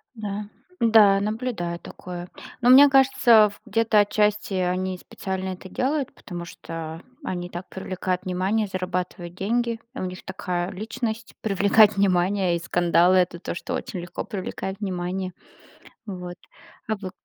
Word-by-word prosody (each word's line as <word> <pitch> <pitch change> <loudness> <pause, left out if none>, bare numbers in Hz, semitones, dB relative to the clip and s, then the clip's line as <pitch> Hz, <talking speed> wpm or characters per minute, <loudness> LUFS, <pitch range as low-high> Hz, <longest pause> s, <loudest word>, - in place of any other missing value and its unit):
Да. 210 -1 -4 0.4
Да, 215 -4 +6
наблюдаю 210 -5 -2
такое. 175 0 -8 0.3
Но 245 - +3
мне 275 +3 +9
кажется, 250 -5 +6
в 205 - -16
где-то 225 0 +4
отчасти 210 -1 +1
они 185 0 -1
специально 190 +1 -5
это 185 0 -8
делают, 275 +5 -1
потому 175 -2 -8
что 165 -1 -7 0.2
они 175 -1 -3
так 175 +1 -7
привлекают 185 -1 -3
внимание, 190 +4 0
зарабатывают 180 -2 -4
деньги. 230 +4 0 0.2
У - - -5
них 185 0 -6
такая 180 -1 -3
личность- 220 +3 -4
привлекать 205 +1 +4
внимание 185 -1 +2
и - - -1
скандалы 175 +1 +3
это 180 -1 +1
то, - - -5
что - - -5
очень 180 - -4
легко 175 0 -6
привлекает 190 0 -5
внимание. 185 -1 -3 0.7
Вот. 180 -3 -6 0.5
А 220 - 0
вы, 190 -2 -7
190 Hz, 140 wpm, -24 LUFS, 180-215 Hz, 0.7 s, мне